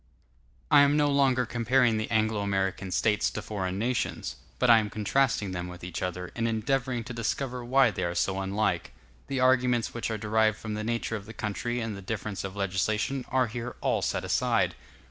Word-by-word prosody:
I -, -, +8 dB
am 145 Hz, +1 st, +4 dB
no 145 Hz, -1 st, +3 dB
longer 135 Hz, -3 st, +3 dB
comparing 120 Hz, 0 st, +2 dB
the 110 Hz, -, -2 dB
Anglo 110 Hz, -2 st, +1 dB
American 95 Hz, -1 st, -1 dB
States 105 Hz, +3 st, +2 dB
to -, -, -5 dB
foreign 95 Hz, -3 st, -3 dB
nations; 120 Hz, +4 st, -2 dB, 0.2 s
but 125 Hz, -, +2 dB
I 115 Hz, -1 st, +8 dB
am 105 Hz, -1 st, -2 dB
contrasting 105 Hz, -1 st, +1 dB
them 90 Hz, -1 st, -4 dB
with 90 Hz, 0 st, -10 dB
each 90 Hz, -2 st, -5 dB
other, 90 Hz, 0 st, -4 dB
and 115 Hz, 0 st, 0 dB
endeavoring 125 Hz, +2 st, 0 dB
to 125 Hz, -, -7 dB
discover 125 Hz, +2 st, -2 dB
why 130 Hz, 0 st, +4 dB
they -, -, -3 dB
are 85 Hz, 0 st, -2 dB
so 95 Hz, +1 st, 0 dB
unlike. 95 Hz, -4 st, -1 dB, 0.3 s
The 135 Hz, -1 st, -2 dB
arguments 125 Hz, -2 st, +3 dB
which 120 Hz, -1 st, -3 dB
are 110 Hz, -, -2 dB
derived 110 Hz, 0 st, +2 dB
from 110 Hz, 0 st, -5 dB
the 105 Hz, 0 st, -3 dB
nature 115 Hz, 0 st, -2 dB
of 105 Hz, -2 st, -7 dB
the 110 Hz, -, -8 dB
country 120 Hz, +3 st, -2 dB
and 115 Hz, -3 st, -3 dB
the 100 Hz, -, -8 dB
difference 105 Hz, 0 st, -4 dB
of 95 Hz, 0 st, -6 dB
legislation 105 Hz, +7 st, -1 dB
are 130 Hz, -1 st, +3 dB
here 120 Hz, +1 st, -5 dB
all -, -, +1 dB
set -, -, -1 dB
aside. -, -, +1 dB
110 Hz, 200 wpm, -28 LUFS, 100-125 Hz, 0.3 s, I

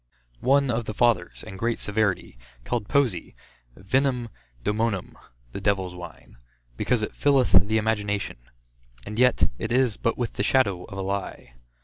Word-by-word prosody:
One 140 Hz, 0 st, +3 dB
of 115 Hz, 0 st, -1 dB
the 110 Hz, -, -5 dB
fathers, 110 Hz, -8 st, +1 dB
in 95 Hz, -3 st, -9 dB
great 115 Hz, +3 st, 0 dB
severity, 105 Hz, -, -1 dB, 0.3 s
called 110 Hz, -, -2 dB
poesy 130 Hz, -, 0 dB, 0.4 s
vinum 125 Hz, +4 st, 0 dB, 0.3 s
doemonum, 105 Hz, -, -1 dB, 0.4 s
[the 100 Hz, -, -6 dB
devils 95 Hz, -3 st, 0 dB
wine] 85 Hz, -7 st, -11 dB, 0.4 s
because 115 Hz, -, 0 dB
it -, -, -4 dB
filleth 140 Hz, -3 st, +3 dB, 0.2 s
the 110 Hz, +1 st, +2 dB
imagination; 105 Hz, -, -1 dB, 0.7 s
and 105 Hz, +2 st, -5 dB
yet, 125 Hz, 0 st, +4 dB
it 110 Hz, -, -3 dB
is 125 Hz, -3 st, +2 dB
but 115 Hz, -, 0 dB
with 120 Hz, -2 st, -2 dB
the -, -, +1 dB
shadow 100 Hz, -8 st, +2 dB
of 100 Hz, -, -9 dB
a 95 Hz, -, -2 dB
lie. 95 Hz, -10 st, -4 dB
110 Hz, 150 wpm, -25 LUFS, 100-120 Hz, 0.7 s, yet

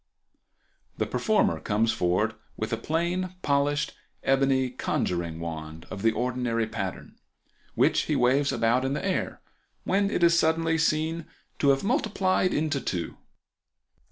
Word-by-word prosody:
—The -, -, 0 dB
performer 220 Hz, -1 st, +1 dB
comes 110 Hz, +2 st, +1 dB
forward 90 Hz, +6 st, +1 dB, 0.2 s
with 110 Hz, +1 st, -3 dB
a -, -, +1 dB
plain 175 Hz, +7 st, -1 dB
polished 145 Hz, +1 st, +1 dB, 0.3 s
ebony 135 Hz, -1 st, +2 dB
conjuring 85 Hz, -9 st, -2 dB
wand 80 Hz, -1 st, -6 dB
of 100 Hz, -, -5 dB
the 115 Hz, +1 st, +4 dB
ordinary 120 Hz, 0 st, -1 dB
pattern, 95 Hz, -4 st, -6 dB, 0.6 s
which -, -, +3 dB
he -, -, +2 dB
waves 135 Hz, +3 st, +3 dB
about 120 Hz, +3 st, +2 dB
in 135 Hz, +1 st, 0 dB
the 145 Hz, -, -3 dB
air, 190 Hz, -, -2 dB, 0.4 s
when 200 Hz, +1 st, +1 dB
it 200 Hz, -, 0 dB
is 170 Hz, 0 st, +5 dB
suddenly 160 Hz, 0 st, +2 dB
seen 160 Hz, +1 st, 0 dB, 0.3 s
to 140 Hz, -, +3 dB
have 135 Hz, 0 st, +3 dB
multiplied 195 Hz, -, +1 dB
into 145 Hz, -3 st, 0 dB
two. 85 Hz, -3 st, -3 dB
135 Hz, 135 wpm, -27 LUFS, 110-165 Hz, 0.6 s, is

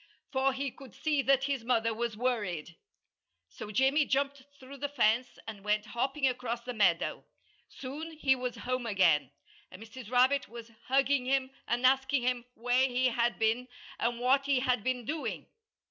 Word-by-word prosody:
For 270 Hz, -1 st, +2 dB
he 270 Hz, 0 st, -3 dB
could 260 Hz, -6 st, -14 dB
see 300 Hz, -3 st, +1 dB
that 270 Hz, 0 st, +3 dB
his 275 Hz, -3 st, -1 dB
mother 230 Hz, -2 st, +1 dB
was 230 Hz, -1 st, -3 dB
worried. 205 Hz, -10 st, -2 dB, 0.7 s
So 210 Hz, -, -9 dB
Jimmy 265 Hz, +7 st, +3 dB
jumped 280 Hz, 0 st, -1 dB, 0.2 s
through 270 Hz, +2 st, -11 dB
the 285 Hz, +1 st, -3 dB
fence 240 Hz, -2 st, +1 dB
and 210 Hz, -3 st, -8 dB
went 210 Hz, 0 st, 0 dB
hopping 270 Hz, +3 st, 0 dB
across 245 Hz, -2 st, -2 dB
the 250 Hz, -, -5 dB
meadow. 185 Hz, -7 st, +1 dB, 0.5 s
Soon 300 Hz, +5 st, -7 dB
he 280 Hz, -4 st, +2 dB
was 250 Hz, -2 st, -4 dB
home 255 Hz, 0 st, -3 dB
again; 170 Hz, -, +3 dB, 0.4 s
and -, -, -12 dB
Mrs. 225 Hz, +1 st, -10 dB
Rabbit 255 Hz, +3 st, +3 dB
was 230 Hz, 0 st, -10 dB, 0.2 s
hugging 270 Hz, 0 st, +2 dB
him 265 Hz, 0 st, +1 dB, 0.2 s
and 245 Hz, +2 st, 0 dB
asking 265 Hz, 0 st, +3 dB
him 245 Hz, -1 st, 0 dB
where 245 Hz, +3 st, +2 dB
he 255 Hz, 0 st, +1 dB
had 235 Hz, 0 st, 0 dB
been 225 Hz, +3 st, +1 dB, 0.3 s
and 235 Hz, 0 st, 0 dB
what 270 Hz, +3 st, +2 dB
he 275 Hz, -3 st, +2 dB
had 250 Hz, -4 st, +1 dB
been 250 Hz, -1 st, -1 dB
doing. 310 Hz, +4 st, -3 dB
250 Hz, 170 wpm, -30 LUFS, 230-270 Hz, 0.7 s, that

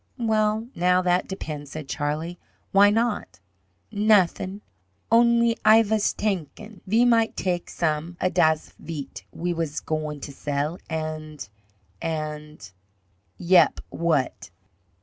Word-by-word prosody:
"Well, 220 Hz, -1 st, +1 dB
now 180 Hz, +1 st, +2 dB
that 180 Hz, 0 st, +1 dB
depends," 150 Hz, -6 st, -6 dB
said 155 Hz, -3 st, -6 dB
Charlie. 155 Hz, +5 st, -3 dB, 0.3 s
"Why 200 Hz, +1 st, +6 dB
not?" 210 Hz, -, -1 dB, 0.5 s
"Nothin', 205 Hz, -2 st, +2 dB, 0.5 s
only 235 Hz, 0 st, +4 dB
Ay 220 Hz, +1 st, +7 dB
vas 215 Hz, -1 st, +1 dB
tankin' 205 Hz, +1 st, -4 dB
ve 225 Hz, +5 st, +4 dB
might 230 Hz, -2 st, +3 dB
tak' 175 Hz, -2 st, -2 dB
some 165 Hz, +1 st, -2 dB
a 185 Hz, -, +1 dB
das 160 Hz, -3 st, +2 dB
veat 150 Hz, -3 st, -7 dB
we 175 Hz, +1 st, -3 dB
vas 165 Hz, -3 st, -3 dB
goin' 155 Hz, -1 st, -3 dB
to 140 Hz, -, -7 dB
sell 145 Hz, +4 st, -3 dB
and 155 Hz, -3 st, -5 dB, 0.5 s
and 150 Hz, -5 st, -5 dB, 0.4 s
" 95 Hz, -, -41 dB, 0.2 s
"Yep, 175 Hz, -3 st, +4 dB
what?" 145 Hz, -, -1 dB
175 Hz, 120 wpm, -24 LUFS, 155-210 Hz, 0.5 s, Ay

